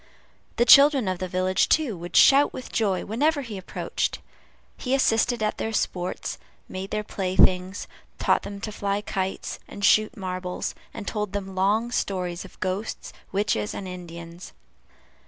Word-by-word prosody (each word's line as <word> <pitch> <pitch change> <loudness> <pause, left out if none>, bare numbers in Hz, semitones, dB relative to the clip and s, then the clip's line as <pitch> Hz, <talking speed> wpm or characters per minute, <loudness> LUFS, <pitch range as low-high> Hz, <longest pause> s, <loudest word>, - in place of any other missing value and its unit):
The 240 - +3
children 275 -4 +7
of 185 -1 -1
the 185 - -3
village, 185 +1 +1
too, 295 -9 +2
would 175 0 -8
shout 280 +1 +7
with 255 - -8
joy 200 -5 0
whenever 285 +7 +1
he 230 -4 -7
approached. 190 -2 -3 0.6
He 260 +1 -1
assisted 235 -2 +2
at 215 - -1
their 225 - -2
sports, 180 -4 -2 0.3
made 190 +1 -6
their 215 0 -2
playthings, 185 -1 +1 0.3
taught - - +2
them 200 0 -7
to 215 - -4
fly 200 0 -2
kites 190 -2 -3
and 200 0 -3
shoot 215 +4 +4
marbles, 185 -2 -4 0.2
and - - -8
told 210 -3 -3
them 195 -1 -4
long 210 +5 +1
stories 180 -6 -2
of 190 - -15
ghosts, 190 +4 -3 0.2
witches, 195 - 0
and 195 - -5
Indians. 170 -1 -9
200 Hz, 155 wpm, -25 LUFS, 185-220 Hz, 0.6 s, children